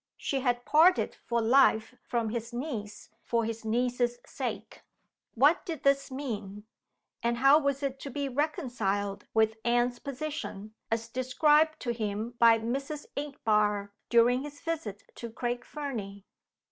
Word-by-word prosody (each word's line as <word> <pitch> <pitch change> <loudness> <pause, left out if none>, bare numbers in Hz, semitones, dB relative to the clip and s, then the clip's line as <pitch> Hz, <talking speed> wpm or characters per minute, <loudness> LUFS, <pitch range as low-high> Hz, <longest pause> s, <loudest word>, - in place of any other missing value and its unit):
She 275 - -1
had 245 -2 0
parted 335 +5 +4
for 235 -1 +1
life 225 -2 +4
from 235 -2 -1
his 230 +1 -4
niece 235 -5 -5
for 230 -1 0
his 225 0 -4
niece's 245 +2 0
sake! - - -5 0.5
What 290 +8 +4
did 320 -5 -6
this 275 0 +3
mean? 210 -7 -5 0.6
And 235 0 0
how 275 +4 +6
was 280 -1 -1
it 270 -1 -2
to 280 - -6
be 280 +1 -3
reconciled 245 - -2
with 220 0 +3
Anne's 240 +1 +1
position 280 -7 -5 0.2
as 225 0 -1
described 295 +6 +3
to 240 - -1
him 220 0 -3
by 230 -1 +7
Mrs. 275 +6 -4
Inchbare 210 -8 0 0.2
during 240 +2 +4
his 290 0 -8
visit 295 - -4
to 235 - -6
Craig 240 +2 -3
Fernie? 215 -11 -6
240 Hz, 140 wpm, -29 LUFS, 220-280 Hz, 0.6 s, by